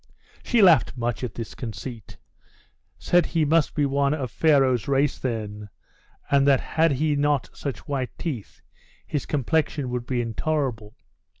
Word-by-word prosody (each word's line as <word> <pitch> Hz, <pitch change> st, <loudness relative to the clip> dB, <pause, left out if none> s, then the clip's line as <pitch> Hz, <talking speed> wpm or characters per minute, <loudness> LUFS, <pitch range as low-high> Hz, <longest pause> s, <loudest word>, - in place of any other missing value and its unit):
She 235 Hz, -4 st, +2 dB
laughed 160 Hz, -8 st, +5 dB
much 120 Hz, +1 st, -2 dB
at 120 Hz, -4 st, -4 dB
this 115 Hz, -2 st, -6 dB
conceit; 115 Hz, 0 st, -8 dB, 0.8 s
said 175 Hz, 0 st, +3 dB
he 165 Hz, -2 st, +1 dB
must 160 Hz, +1 st, +2 dB
be 150 Hz, -, +2 dB
one 140 Hz, +1 st, +1 dB
of 130 Hz, -5 st, -4 dB
Pharaoh's 135 Hz, -7 st, +3 dB
race 140 Hz, +1 st, +1 dB
then, 105 Hz, -4 st, -4 dB, 0.6 s
and 140 Hz, 0 st, +4 dB
that 135 Hz, -2 st, +5 dB
had 160 Hz, -1 st, +1 dB
he 150 Hz, +2 st, +1 dB
not 145 Hz, -2 st, 0 dB
such 135 Hz, -7 st, -6 dB
white 135 Hz, -4 st, -2 dB
teeth, 135 Hz, -, -6 dB, 0.4 s
his 145 Hz, -, -3 dB
complexion 145 Hz, -2 st, 0 dB
would 125 Hz, -1 st, -4 dB
be 125 Hz, -2 st, -1 dB
intolerable. 120 Hz, -2 st, -2 dB
135 Hz, 145 wpm, -24 LUFS, 120-150 Hz, 0.8 s, laughed